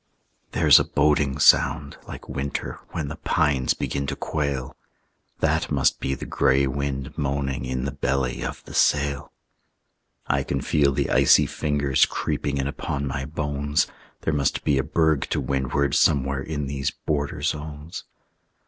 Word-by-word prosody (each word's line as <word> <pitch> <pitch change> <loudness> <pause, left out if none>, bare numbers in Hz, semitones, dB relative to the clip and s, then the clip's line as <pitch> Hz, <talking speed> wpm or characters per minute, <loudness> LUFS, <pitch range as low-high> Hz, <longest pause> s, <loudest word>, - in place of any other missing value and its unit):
There's - - +7
a - - +2
boding 70 -1 +1
sound, 70 +1 +4
like - - -9
winter 70 +1 -4
When 80 -4 -4
the 80 +2 -6
pines 75 -5 +1
begin 70 0 -3
to 70 - -2
quail; 70 -5 -3 0.7
That - - +1
must - - +2
be 70 - -1
the - - -7
gray 70 +1 +2
wind 70 +1 -3
moaning 70 -2 -2
In 65 0 -2
the 70 - -2
belly 65 -2 -1
of - - -6
the - - -11
sail. 70 -1 +1 0.9
I - - +1
can 70 - -2
feel 70 +1 +2
the 70 0 -1
icy - - +5
fingers 70 -3 +1
Creeping 70 -1 -2
in 70 - -1
upon 70 0 -3
my 70 -1 -3
bones; 75 0 -1 0.4
There 80 - -1
must 70 -2 0
be 70 -2 +2
a - - +1
berg 80 -1 +1
to - - 0
windward 70 0 0
Somewhere 70 -1 +2
in 75 0 -3
these 70 0 -2
border 75 -1 -3
zones. 75 +1 -4
70 Hz, 155 wpm, -24 LUFS, 70-75 Hz, 0.9 s, There's